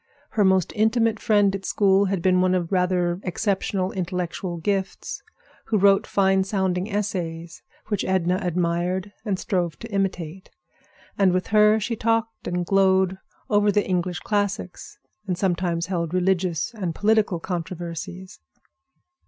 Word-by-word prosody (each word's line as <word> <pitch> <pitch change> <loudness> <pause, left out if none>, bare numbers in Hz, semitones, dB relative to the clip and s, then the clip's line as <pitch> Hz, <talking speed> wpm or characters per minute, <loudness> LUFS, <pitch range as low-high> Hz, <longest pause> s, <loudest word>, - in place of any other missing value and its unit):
Her 210 - +2
most 190 -3 +2
intimate 220 0 +2
friend 205 -4 +3
at 195 - -6
school 195 0 +3
had 190 -3 -2
been 185 -1 +4
one 185 0 +3
of 175 -2 -2
rather 180 -1 +1
exceptional 190 0 -1
intellectual 180 -1 -3
gifts, 195 +3 -3 0.4
who 220 - +1
wrote 195 0 +4
fine 190 -1 +3
sounding 190 -1 -1
essays, 170 -5 -3 0.3
which 205 -3 0
Edna 185 -1 +1
admired 180 +2 -1
and 205 -4 -1
strove 175 -4 -1
to 230 -1 -9
imitate; 185 -2 -2 0.7
and 195 -2 +5
with 185 0 -1
her 210 +1 +6
she 230 +2 -2
talked 225 +1 -1
and 175 0 -1
glowed 190 0 +3 0.3
over 205 0 +3
the 205 +1 +1
English 180 -1 -1
classics, 205 -3 -3 0.3
and 180 -2 -1
sometimes 175 -2 0
held 175 -2 -2
religious 180 -2 0
and 185 -7 -4
political 210 -4 +2
controversies. 175 +1 -6
190 Hz, 135 wpm, -24 LUFS, 175-200 Hz, 0.7 s, her